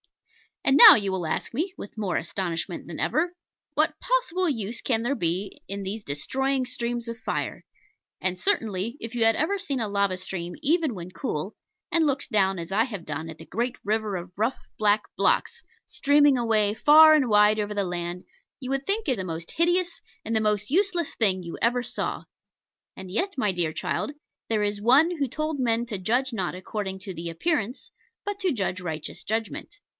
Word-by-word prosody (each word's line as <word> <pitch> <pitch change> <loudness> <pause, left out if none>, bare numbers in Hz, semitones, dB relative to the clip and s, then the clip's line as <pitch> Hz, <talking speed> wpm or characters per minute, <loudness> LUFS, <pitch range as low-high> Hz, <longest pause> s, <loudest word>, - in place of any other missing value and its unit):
And 270 - +5
now - - +12
you 200 -3 0
will 185 -3 -2
ask - - -3
me, 345 +7 -1
with 205 - -9
more 195 -5 -1
astonishment 170 0 -3
than 170 - -7
ever, 345 +3 0 0.4
what - - +1
possible 485 -8 +1
use 230 -4 -3
can 225 -3 +1
there 270 +4 0
be 180 0 -2
in 200 0 -4
these 205 +3 -5
destroying 265 - -1
streams 235 -1 -3
of 230 0 -5
fire? - - -3 0.5
And 185 -1 -1
certainly, 225 - 0
if 230 0 -6
you 235 - +2
had 225 0 +5
ever 365 +7 0
seen 285 -9 -2
a 220 - -1
lava 200 -2 0
stream 180 -1 -5
even 315 -2 +2
when 180 0 -8
cool, 190 - -4 0.4
and 330 -1 +3
looked 280 -2 -1
down, 195 -3 +3
as 170 +1 -6
I 215 +3 +3
have 205 -9 -7
done, 155 +1 -4
at 160 - -9
the 160 - -11
great 235 - -2
river 215 -1 -1
of 175 0 -6
rough 225 +5 0 0.2
black 210 0 +3
blocks - - +1 0.2
streaming 290 -1 +4
away 215 -3 +2
far 310 +7 +8
and 285 -4 +3
wide 210 0 +5
over 210 0 -2
the 205 -1 0
land, 175 0 -4 0.4
you 255 - -6
would 275 0 -1
think 425 +1 0
it 260 -4 +1
the 190 - -3
most 165 -1 -5
hideous 350 +1 +1 0.3
and 225 - -1
the 220 - +3
most 210 -1 0
useless 350 -2 +1
thing 190 -5 +2
you 170 - -7
ever 245 +1 +2
saw. - - -3 0.7
And 190 -1 -9
yet, 375 - -1
my 210 -6 +2
dear 170 -3 -1
child, - - -2 0.4
there 215 -2 +1
is 205 0 -1
One 290 +10 +4
who 280 -2 0
told 305 +3 -3
men 235 -2 +1
to 215 -4 -3
judge 245 +7 0
not 185 -5 -2
according 190 0 -5
to 190 0 -7
the 170 0 -5
appearance, 245 - -2 0.3
but 405 0 -3
to 380 -3 +1
judge 195 -7 -2
righteous 160 -4 -5
judgment. 225 - -4
220 Hz, 195 wpm, -26 LUFS, 190-275 Hz, 0.7 s, now